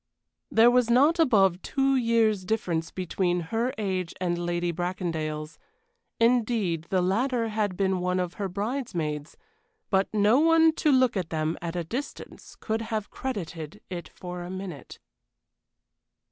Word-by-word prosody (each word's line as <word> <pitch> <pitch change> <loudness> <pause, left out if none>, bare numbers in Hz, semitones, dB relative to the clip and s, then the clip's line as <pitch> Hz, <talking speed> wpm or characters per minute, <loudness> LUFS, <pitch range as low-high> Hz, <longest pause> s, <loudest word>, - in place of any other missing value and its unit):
There 230 +2 +6
was 245 -1 +3
not 285 +8 +4
above 195 - +4
two 270 -1 +1
years' 230 -5 +2
difference 180 -6 -1
between 180 -1 -1
her 235 +3 +1
age 185 -5 -2
and 175 -1 0
Lady 175 0 -1
Bracondale's; 165 -3 -3 0.6
indeed, 225 -8 +2
the 185 -2 +2
latter 230 +5 +1
had 210 -4 -1
been 190 -2 +1
one 180 +1 0
of 180 -1 -2
her 195 - -1
bridesmaids; 180 - -3 0.5
but 190 -1 +2
no 215 +4 +4
one 325 0 +5
to 300 - +3
look 255 -3 +4
at 180 -4 -2
them 160 0 -1
at 170 0 -4
a 175 - -1
distance 245 - -7
could 220 0 -2
have 220 -2 -4
credited 175 - -5
it 175 -3 -6
for 180 -1 -7
a 175 - -7
minute. 185 -7 -7
190 Hz, 145 wpm, -27 LUFS, 175-230 Hz, 0.6 s, There